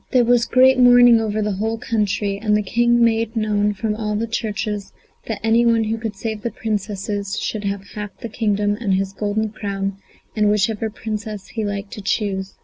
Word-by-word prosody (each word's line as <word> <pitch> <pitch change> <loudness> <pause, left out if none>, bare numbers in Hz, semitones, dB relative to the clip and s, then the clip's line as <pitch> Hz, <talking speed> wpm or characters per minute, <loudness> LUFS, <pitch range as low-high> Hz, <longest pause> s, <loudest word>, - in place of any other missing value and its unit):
] - - -40
There 250 -2 +5
was 240 0 +3
great 260 0 +5
mourning 245 -2 +7
over 215 -1 -1
the 210 - -1
whole 220 +4 -2
country, 205 -3 -1
and 210 -1 +2
the 210 - -1
King 240 +3 +3
made 225 0 +1
known 210 -1 +1
from 215 +1 -1
all 210 -1 -2
the 220 +2 -1
churches 210 -2 -3 0.4
that 220 -3 -3
any 225 +1 +4
one 230 -1 +3
who 220 +1 -2
could 220 -2 -4
save 220 +1 -4
the 235 - -2
Princesses 205 -2 -3
should 210 -2 -3
have 200 0 -4
half 210 -1 -7
the - - -6
kingdom 205 -2 0
and 200 -5 +1
his 195 0 -2
golden 215 +2 -1
crown 195 -2 -4 0.4
and 210 -1 +3
whichever 210 +1 +1
princess 215 -1 -6
he 225 - -3
liked 200 -1 -4
to 210 - -7
choose. 195 -1 -2
215 Hz, 200 wpm, -21 LUFS, 205-225 Hz, 0.4 s, mourning